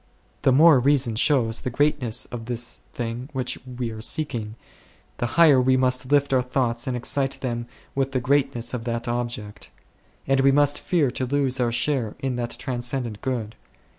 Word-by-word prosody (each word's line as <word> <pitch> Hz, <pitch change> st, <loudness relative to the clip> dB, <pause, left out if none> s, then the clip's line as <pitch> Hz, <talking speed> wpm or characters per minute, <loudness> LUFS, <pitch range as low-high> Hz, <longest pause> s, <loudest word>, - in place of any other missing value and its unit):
The 135 Hz, -, +4 dB
more 150 Hz, +1 st, +7 dB
reason 125 Hz, -3 st, +2 dB
shows 115 Hz, -3 st, +2 dB
the -, -, -3 dB
greatness 130 Hz, -3 st, 0 dB
of 120 Hz, -2 st, -6 dB
this 120 Hz, -1 st, -3 dB
thing 120 Hz, +2 st, -5 dB
which 130 Hz, -2 st, -2 dB
we 125 Hz, -2 st, -4 dB
are 110 Hz, 0 st, -8 dB
seeking, 115 Hz, -5 st, -2 dB, 0.6 s
the 120 Hz, -, -1 dB
higher 150 Hz, -6 st, +7 dB
we 130 Hz, +1 st, +3 dB
must 130 Hz, 0 st, 0 dB
lift 140 Hz, -1 st, +3 dB
our 130 Hz, -, +4 dB
thoughts 125 Hz, -1 st, -1 dB
and 125 Hz, -1 st, -1 dB
excite 135 Hz, +2 st, -1 dB
them 120 Hz, -2 st, -3 dB, 0.3 s
with 135 Hz, 0 st, -1 dB
the 130 Hz, -, 0 dB
great 140 Hz, +1 st, +1 dB
ness 120 Hz, +1 st, -4 dB
of 120 Hz, -2 st, -4 dB
that 115 Hz, 0 st, -3 dB
object; 120 Hz, -3 st, -4 dB, 0.6 s
and 135 Hz, 0 st, +2 dB
we 135 Hz, +1 st, +5 dB
must 145 Hz, +1 st, +3 dB
fear 155 Hz, -8 st, +1 dB
to 130 Hz, +1 st, -3 dB
lose 135 Hz, -1 st, 0 dB
our 120 Hz, -2 st, +1 dB
share 120 Hz, -2 st, 0 dB
in 135 Hz, -3 st, -2 dB
that 120 Hz, -1 st, -3 dB
transcendent 120 Hz, -3 st, -4 dB
Good. 115 Hz, -5 st, -3 dB
125 Hz, 180 wpm, -24 LUFS, 120-135 Hz, 0.6 s, more